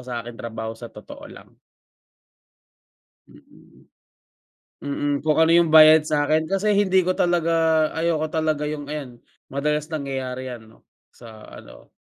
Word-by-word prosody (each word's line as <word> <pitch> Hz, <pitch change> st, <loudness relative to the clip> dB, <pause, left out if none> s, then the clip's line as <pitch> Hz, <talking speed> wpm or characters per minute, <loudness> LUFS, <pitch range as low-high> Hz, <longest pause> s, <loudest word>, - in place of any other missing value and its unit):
sa 120 Hz, -2 st, -6 dB
aking 120 Hz, -1 st, -10 dB
trabaho 110 Hz, -1 st, -6 dB
sa 115 Hz, +1 st, -11 dB
totoo -, -, -13 dB
lang. -, -, -15 dB, 1.8 s
Mm. -, -, -21 dB, 0.9 s
Mm, 145 Hz, 0 st, -2 dB
kung 155 Hz, -1 st, 0 dB
ano 160 Hz, +1 st, +4 dB
yung 170 Hz, -1 st, +4 dB
bayad 155 Hz, 0 st, +7 dB
sa’kin 155 Hz, +1 st, 0 dB
kasi 195 Hz, +2 st, 0 dB
hindi 190 Hz, -2 st, +2 dB
ko 185 Hz, -, +1 dB
talaga 165 Hz, -3 st, +1 dB
ayoko 160 Hz, -1 st, -1 dB
talaga 155 Hz, -2 st, -1 dB
yung 150 Hz, -1 st, -5 dB
ayan, 135 Hz, -6 st, -7 dB, 0.3 s
madalas 150 Hz, +2 st, -2 dB
nangyayari 130 Hz, -3 st, -5 dB
‘yan 110 Hz, -3 st, -11 dB, 0.4 s
sa 110 Hz, -3 st, -14 dB
ano, 65 Hz, -1 st, -15 dB
150 Hz, 130 wpm, -22 LUFS, 125-160 Hz, 1.8 s, bayad